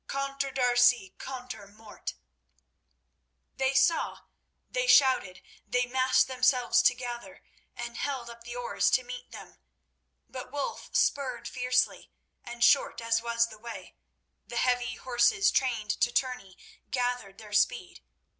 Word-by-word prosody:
Contre 275 0 -2
D'Arcy, 245 -5 +3
contre 250 -5 -7
Mort!_" 210 +1 -9 1.4
They 265 0 +1
saw, 275 +5 +2 0.5
they - - -1
shouted, 260 - +4 0.2
they 250 0 +1
massed 255 +1 +3
themselves 255 -1 +3
together 245 -1 -2 0.3
and 240 0 -6
held 265 -4 -3
up 235 0 -11
the 240 +1 -8
oars 200 -5 0
to 255 - +2
meet 250 0 -8
them. - - -12 0.7
But 255 -1 -8
Wulf 285 -1 -4
spurred 275 - 0
fiercely, 250 0 0 0.3
and, 240 0 -4
short 280 - +4
as 230 0 +1
was 235 0 +1
the 215 -1 -13
way, 235 +1 -9 0.5
the - - -7
heavy 245 -2 +1
horses, 255 - +2
trained 230 -6 0
to 240 - +3
tourney, 250 -7 -2 0.3
gathered 245 -6 -2
their 210 -2 -12
speed. 205 - 0
245 Hz, 125 wpm, -29 LUFS, 235-260 Hz, 1.4 s, shouted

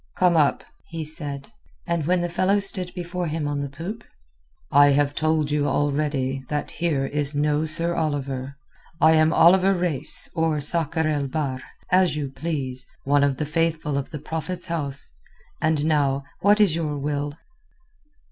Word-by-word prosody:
"Come 180 -2 +3
up," 150 -3 +2 0.2
he 165 -2 -5
said. 145 +2 -4 0.3
And 170 -4 -1
when 180 0 +2
the 175 - 0
fellow 185 +4 +1
stood 185 -2 +1
before 175 0 -4
him 155 -1 -2
on 145 -1 -2
the 140 - -4
poop—"I 140 - -2
have 145 0 +2
told 155 -1 0
you 145 -1 +1
already 140 -3 -1
that 150 -1 -3
here 155 -6 -1
is 145 +1 -1
no 150 +1 +1
Sir 165 +2 0
Oliver. 140 -4 -3 0.4
I 160 - +6
am 160 0 +4
Oliver 185 +4 +5
Reis 175 -6 +1
or 160 -2 0
Sakr 160 +1 0
el 145 -2 0
Bahr, 135 -3 -3 0.3
as 185 -3 +3
you 145 -3 -3
please, 135 -5 -4 0.2
one 140 +1 +3
of 140 -2 +1
the 150 - -2
Faithful 160 -1 -1
of 140 -1 -2
the 150 - -6
Prophet's 160 +4 -4
House. 145 -5 -4 0.5
And 155 -1 +1
now 140 -3 +1 0.2
what 205 +2 +4
is 200 -7 +4
your 155 -3 -2
will?" 145 +1 -3
150 Hz, 160 wpm, -23 LUFS, 140-165 Hz, 0.5 s, I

